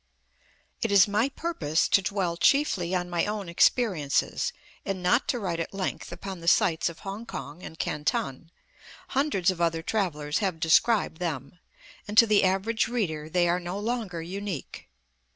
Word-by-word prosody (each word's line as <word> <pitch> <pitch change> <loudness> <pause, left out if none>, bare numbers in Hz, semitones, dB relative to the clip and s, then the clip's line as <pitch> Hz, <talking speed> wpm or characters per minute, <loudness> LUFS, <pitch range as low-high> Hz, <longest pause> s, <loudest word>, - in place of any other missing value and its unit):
It 225 - 0
is 200 0 +7
my 215 +6 +1
purpose 175 - -1
to 195 - +5
dwell 185 -3 -1
chiefly 190 - +2
on 180 -1 -1
my 175 0 0
own 210 -2 -3
experiences, 170 - +1 0.3
and 195 -2 -4
not 205 +8 +3
to 250 - 0
write 180 -7 -3
at 165 - -4
length 190 -2 -3
upon 195 -2 -7
the 170 - -9
sights 170 -1 +3
of 165 - -12
Kong 200 +3 -6
kong 150 -3 -7
and 160 - -9
Canton; 150 0 -2 0.6
hundreds 260 - +1
of 175 -2 -6
other 165 -1 +1
travellers 155 -8 -1
have 190 -6 -1
described 165 +2 +3
them, 160 -2 -4 0.5
and 210 +1 -5
to 230 - +9
the 210 -2 +3
average 195 +5 +1
reader 160 -11 -2
they 175 +1 +2
are 175 +1 +1
no 180 +2 -5
longer 210 -6 -3
unique. 190 -3 -6
185 Hz, 165 wpm, -27 LUFS, 165-210 Hz, 0.6 s, to